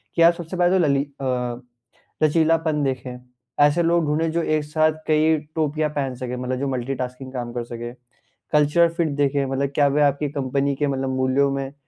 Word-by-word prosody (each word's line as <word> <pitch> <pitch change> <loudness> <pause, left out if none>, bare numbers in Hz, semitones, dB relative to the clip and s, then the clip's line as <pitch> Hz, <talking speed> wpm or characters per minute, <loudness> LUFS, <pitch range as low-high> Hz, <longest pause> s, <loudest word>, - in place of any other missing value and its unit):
कि 170 - +1
आप 170 +1 +7
सबसे 175 +1 -7
पहले 180 +1 +3
तो 175 - +3
लली 140 -1 +2 0.2
अ, - - -3 1.0
लचीलापन 160 -1 +2
देखें, 130 -2 -3 0.4
ऐसे 145 +4 +4
लोग 170 0 +2
ढूँढ़ें 155 +2 0
जो 170 +1 0
एक 155 -1 0
साथ 155 +1 +2 0.2
कई 155 +1 +3 0.2
टोपियाँ 155 -1 0
पहन 135 -3 -2
सकें 125 0 -5
मतलब 125 0 -3
जो 140 - -1
मल्टीटास्किंग 130 0 -4
काम 120 -2 -4
कर 120 -1 -3
सकें। 120 0 -7 0.6
कल्चरल 150 +3 +4
फिट 165 -2 0
देखें 140 -1 +1
मतलब 135 +1 -1
क्या 145 -1 +4
वह 145 +1 +3
आपकी 145 +1 0
कंपनी 140 0 -1
के 145 +1 0
मतलब 135 -1 -1
मूल्यों 130 +2 +2
में 135 0 -4
145 Hz, 185 wpm, -22 LUFS, 130-155 Hz, 1.0 s, आप